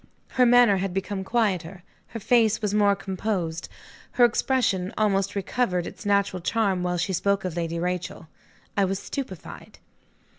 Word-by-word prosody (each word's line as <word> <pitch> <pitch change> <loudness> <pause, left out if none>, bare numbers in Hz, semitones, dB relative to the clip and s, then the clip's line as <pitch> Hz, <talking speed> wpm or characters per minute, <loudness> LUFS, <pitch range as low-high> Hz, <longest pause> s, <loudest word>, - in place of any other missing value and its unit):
Her 250 -1 +3
manner 240 -4 +6
had 190 -1 -3
become 195 0 -3
quieter; 190 -5 -1 0.2
her 230 - -7
face 220 -1 +3
was 210 -2 -2
more 205 -1 +4
composed; 190 -4 -3 0.4
her 245 - +6
expression 225 -6 +1
almost 200 -2 +1
recovered 190 -3 -1
its 205 - -8
natural 200 -2 +1
charm 195 -1 0
while 180 0 -1
she 175 +3 -1
spoke 200 +2 0
of 180 -3 -3
Lady 170 -1 -2
Rachel. 180 -1 -3 0.5
I 200 - +3
was 195 0 0
stupefied. 200 - -7
195 Hz, 150 wpm, -25 LUFS, 180-215 Hz, 0.5 s, manner